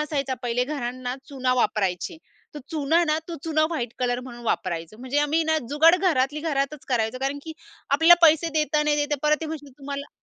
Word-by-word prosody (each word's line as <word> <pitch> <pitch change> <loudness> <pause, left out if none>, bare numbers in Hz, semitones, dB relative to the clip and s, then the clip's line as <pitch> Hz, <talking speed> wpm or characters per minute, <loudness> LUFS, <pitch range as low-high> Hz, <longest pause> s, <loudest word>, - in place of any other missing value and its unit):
असायचा 280 -3 -2
पहिले 245 0 0
घरांना 255 -3 -4
चुना 260 -3 0
वापरायची. 210 - -1 0.4
तर 295 - -6
चुना 320 +1 +2
ना 310 -1 +1
तो 340 - -4
चुना 310 -1 +2
व्हाईट 245 -9 -3
कलर 245 -1 0
म्हणून 240 -2 -10
वापरायचं. 170 -3 -2
म्हणजे 260 +3 -1
आम्ही 300 +3 +2
ना 315 0 +2
जुगाड 315 +5 +5
घरातली 300 -6 +1
घरातच 295 -2 -2
करायचो 235 -1 0
कारण 275 +1 -1
की 320 - -7 0.4
आपल्याला 325 +5 +7
पैसे 320 +1 +3
देता, 300 -1 +1
नाही 300 0 +2
देता 295 0 0
परत 300 0 +3
ते 320 - -4
म्हणशील 295 -3 -7
तुम्हाला 280 0 -6
285 Hz, 190 wpm, -24 LUFS, 255-310 Hz, 0.4 s, आपल्याला